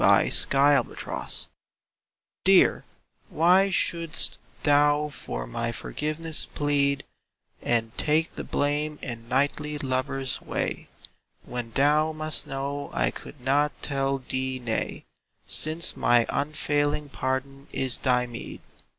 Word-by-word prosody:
jforGiveness 140 -2 +2 1.0
EAR, - - +5 0.5
why 180 +4 +4
shouldst 170 -3 +1 0.2
thou 145 0 +4
for - - -5
my 115 - -3
forgiveness 155 +6 -2
plead 140 -1 +1 0.6
And 115 -1 0
take 155 +2 +1
the - - -5
blame 150 +1 -1
in 115 -2 -6
knightly 145 +3 0
lover's 135 -1 -2
way, - - -3 0.6
When 120 -2 -5
thou 150 +3 +3
must 155 -1 +1
know 140 +1 -4
I - - +1
could 145 - -11
not 145 +3 +1
tell 135 -1 0
thee 130 0 -2
nay, 120 -3 -3 0.4
Since 160 +2 0
my 120 -1 +3
unfailing 145 0 0
pardon 135 +1 -3
is 130 -3 +3
thy 125 -2 +2
meed? 120 -1 -8
140 Hz, 105 wpm, -26 LUFS, 130-150 Hz, 1.0 s, EAR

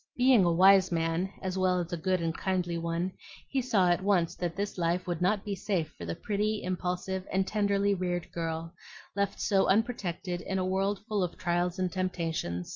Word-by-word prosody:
Being 250 -6 +5
a 170 - +3
wise 190 +2 +6
man 165 +3 0
as 190 0 -2
well 185 -1 +2
as 175 +1 -4
a - - +2
good 185 +2 0
and 165 0 -1
kindly 180 -2 -1
one, 170 +2 -1 0.4
he 270 - 0
saw 210 -7 +2
at 175 - +1
once 190 -4 +2
that 175 -2 -3
this 200 -1 -3
life 175 +2 0
would 175 -2 -3
not 200 +3 +1
be 205 - -2
safe 180 -5 -2
for 85 - -8
the 85 0 -3
pretty, 210 +1 -1
impulsive, 185 +1 -2
and 190 0 +2
tenderly 200 -1 +1
reared 180 -2 -2
girl, 165 0 -4 0.4
left 200 -1 -1
so 195 -3 +2
unprotected 190 -5 0
in 190 +2 -3
a 185 - 0
world 195 +2 0
full 210 -2 0
of 180 -2 -2
trials 175 0 0
and 185 -1 -1
temptations. 165 - -2
185 Hz, 200 wpm, -29 LUFS, 170-195 Hz, 0.4 s, wise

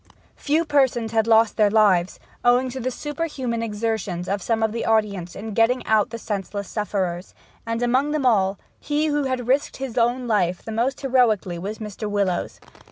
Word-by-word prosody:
Few 310 +3 +1
persons 260 -7 +1
had 225 -1 +1
lost 225 -1 +4
their 210 -2 +4
lives, 200 -4 +3 0.2
owing 250 +1 +3
to 260 - -5
the 255 +1 -1
superhuman 275 -4 -3
exertions 210 -5 -3
of 200 0 -1
some 225 +3 0
of 220 - +1
the 230 - -3
audience 205 -6 0
in 215 +2 -6
getting 240 +3 +2
out 215 -1 +2
the 230 - -6
senseless 200 -2 -4
sufferers; 190 -4 -3 0.3
and, 230 +1 -1
among 255 +4 +2
them 295 -3 -1
all, 195 -5 +3 0.2
he 295 +1 0
who 295 -2 0
had 255 -2 -2
risked 270 +3 +1
his 260 -2 -3
own 240 +2 +1
life 185 -5 0
the 225 - -5
most 240 +5 -1
heroically 230 -10 +2
was 205 +5 -5
Mr. 210 0 -6
Willowes. 200 -3 -1
225 Hz, 180 wpm, -23 LUFS, 205-255 Hz, 0.3 s, lost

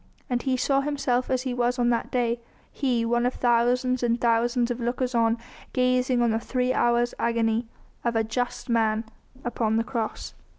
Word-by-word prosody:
And 245 -1 +1
he 260 -2 0
saw 275 +2 +2
himself 275 -3 0
as 255 -1 0
he 255 -2 -2
was 245 +1 0
on 240 -1 +2
that 235 - -1
day, 240 -1 0 0.3
he 245 -4 0
one 240 +1 +1
of 250 +1 0
thousands 250 +1 +2
and 240 0 +1
thousands 235 +1 +2
of 245 - -3
lookers 245 +1 -1
on 230 -1 +2 0.4
gazing 255 -1 +2
on 235 - +2
the 220 - +1
three 250 +1 0
hours' 240 0 +2
agony 230 0 +1 0.4
of 235 -1 0
a 225 - +3
just 245 +3 -3
Man 225 -2 +1 0.4
upon 225 -2 0
the 225 - +2
Cross. 230 -2 -4
240 Hz, 180 wpm, -26 LUFS, 230-250 Hz, 0.4 s, a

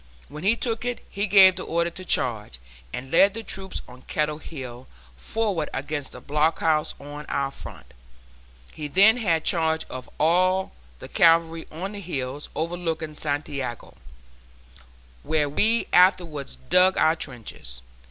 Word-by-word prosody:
When 150 +3 -9
he 210 +4 +4
took 230 -1 -3
it, 245 -1 -4
he 200 +1 -1
gave 190 -1 +8
the 185 - -4
order 170 +1 -1
to 185 - -9
charge, 110 - 0 0.3
and 130 +1 -7
led 195 +4 +5
the 225 - -5
troops 190 -2 -6
on 125 +1 -14
Kettle 150 +2 -2
Hill 130 -5 -9 0.3
forward 205 -9 -2
against 145 0 -4
the - - -9
blockhouse 155 +1 +1
on 145 +1 -9
our 140 -1 -1
front. - - -12 0.8
He 150 - -5
then 200 +9 +6
had 170 -9 +1
charge 160 -1 +1
of 130 0 -8
all 185 +4 +2 0.3
the - - -10
cavalry 165 -1 +3
on 180 +6 -5
the 205 -1 -7
hills 140 -5 -5
overlooking 165 -1 -3
Santiago, 145 -5 -4 1.3
where 150 -1 +1
we 220 +11 +1
afterwards 175 -6 +3 0.2
dug 185 +1 +5
our 160 - +4
trenches. 115 - -8
160 Hz, 145 wpm, -24 LUFS, 145-185 Hz, 1.3 s, gave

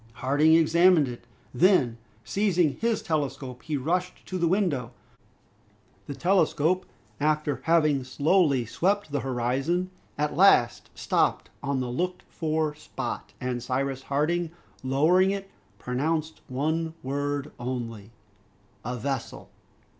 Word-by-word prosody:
Harding 145 +6 +3
examined 165 -1 +5
it; 120 -1 -8 0.3
then 130 - +3 0.2
seizing 180 -7 +1
his 230 -2 0
telescope 140 -5 -3
he 155 -2 -2
rushed 180 +6 -2
to 185 - -4
the 170 - +2
window. 160 - 0 1.1
The 140 - -5
telescope, 180 0 +2 0.3
after 150 -1 0
having 155 -5 +3
slowly 140 0 +2
swept 195 - 0
the 145 - 0
horizon, 135 +9 -1 0.3
at 150 0 -1
last 160 -10 +4
stopped - - 0
on 140 -2 -1
the 125 -1 -3
looked 180 +8 -2
for 155 -1 -1
spot, 150 - -6
and 125 -1 -3
Cyrus 135 +2 -2
Harding, 160 +5 0 0.3
lowering 155 +9 +3
it, 195 0 -4 0.3
pronounced 155 +7 -2
one 160 +5 -1
word 145 +1 -2
only, 115 -4 -5 0.7
"A 125 +2 -3
vessel!" 135 0 -4
150 Hz, 115 wpm, -26 LUFS, 130-175 Hz, 1.1 s, examined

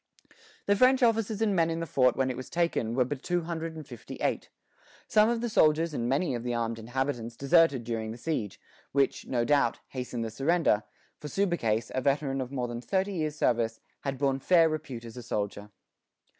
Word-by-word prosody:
The 200 - +3
French 255 +3 +4
officers 225 -2 +2
and 205 -3 +2
men 165 -2 +3
in 165 0 -2
the 165 - -2
fort 130 -5 +3
when 130 -1 +1
it - - -5
was 130 +1 -7
taken 165 -10 0
were 125 -1 +3
but 135 +1 -5
two 175 +2 0
hundred 165 -1 -4
and 155 -2 -8
fifty 120 -4 -9
eight. - - -2 0.6
Some 215 +1 +4
of 235 -1 0
the 240 - -1
soldiers 160 -5 +3
and 120 -3 -1
many 140 +3 +1
of 120 - -3
the 120 0 -2
armed 115 -1 -2
inhabitants 120 0 -3
deserted 140 -3 +4
during 115 -1 -3
the 115 - -6
siege, 120 -7 -3 0.3
which, 140 -1 +1
no 120 -2 0
doubt, 145 0 +2
hastened 125 -3 -4
the 110 - -5
surrender; 135 -2 +2 0.4
for 150 - -7
Subercase, 135 - 0
a 130 - 0
veteran 140 0 0
of 130 0 -5
more 125 -3 -2
than 120 0 -5
thirty 195 +7 -1
years' 155 -4 -2
service, 115 -5 +1 0.2
had 135 -1 -3
borne 135 0 +1
fair 165 +3 +5
repute 150 -7 -5
as 115 +1 -10
a - - -5
soldier. 105 -2 -4
135 Hz, 205 wpm, -29 LUFS, 120-165 Hz, 0.6 s, fair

